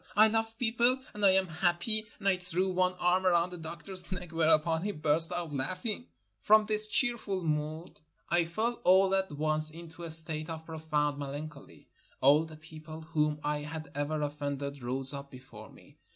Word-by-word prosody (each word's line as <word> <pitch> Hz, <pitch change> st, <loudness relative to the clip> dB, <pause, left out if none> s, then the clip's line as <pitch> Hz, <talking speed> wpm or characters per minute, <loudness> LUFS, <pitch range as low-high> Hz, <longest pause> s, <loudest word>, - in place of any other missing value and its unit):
I 215 Hz, +2 st, +6 dB
love 225 Hz, 0 st, -2 dB
people, 240 Hz, +2 st, +2 dB, 0.2 s
and 210 Hz, -, -7 dB
I 200 Hz, -, +7 dB
am 190 Hz, 0 st, +3 dB
happy, 175 Hz, +6 st, -1 dB
and 200 Hz, -, -5 dB
I 195 Hz, -, +4 dB
threw 180 Hz, +1 st, -1 dB
one 185 Hz, 0 st, +1 dB
arm 180 Hz, +1 st, +1 dB
around 175 Hz, 0 st, +2 dB
the 180 Hz, -, -8 dB
doctor's 175 Hz, +3 st, +1 dB
neck, 180 Hz, -2 st, -6 dB
whereupon 160 Hz, 0 st, +2 dB
he 205 Hz, +3 st, -2 dB
burst 155 Hz, 0 st, +1 dB
out 170 Hz, -4 st, -4 dB
laughing. 185 Hz, -, -4 dB, 0.3 s
From 215 Hz, 0 st, +4 dB
this 215 Hz, 0 st, 0 dB
cheerful 215 Hz, -6 st, 0 dB
mood 155 Hz, +2 st, -4 dB, 0.3 s
I 170 Hz, 0 st, +2 dB
fell 225 Hz, +8 st, -3 dB
all 190 Hz, +1 st, +4 dB
at 190 Hz, -2 st, 0 dB
once 155 Hz, +1 st, +2 dB
into 165 Hz, +1 st, -11 dB
a 170 Hz, -, -6 dB
state 160 Hz, 0 st, +5 dB
of 160 Hz, -1 st, -7 dB
profound 150 Hz, -3 st, -2 dB
melan 145 Hz, +2 st, -5 dB
choly. -, -, -17 dB, 0.3 s
All 145 Hz, +4 st, +4 dB
the 160 Hz, -1 st, -12 dB
people 155 Hz, 0 st, -11 dB
whom 150 Hz, -2 st, -1 dB
I 150 Hz, 0 st, -1 dB
had 155 Hz, +1 st, -8 dB
ever 150 Hz, +1 st, -2 dB
offended 145 Hz, -1 st, -5 dB
rose 130 Hz, +3 st, +3 dB
up 140 Hz, 0 st, -7 dB
before 125 Hz, -5 st, -13 dB
me. -, -, -20 dB
165 Hz, 180 wpm, -30 LUFS, 150-185 Hz, 0.3 s, I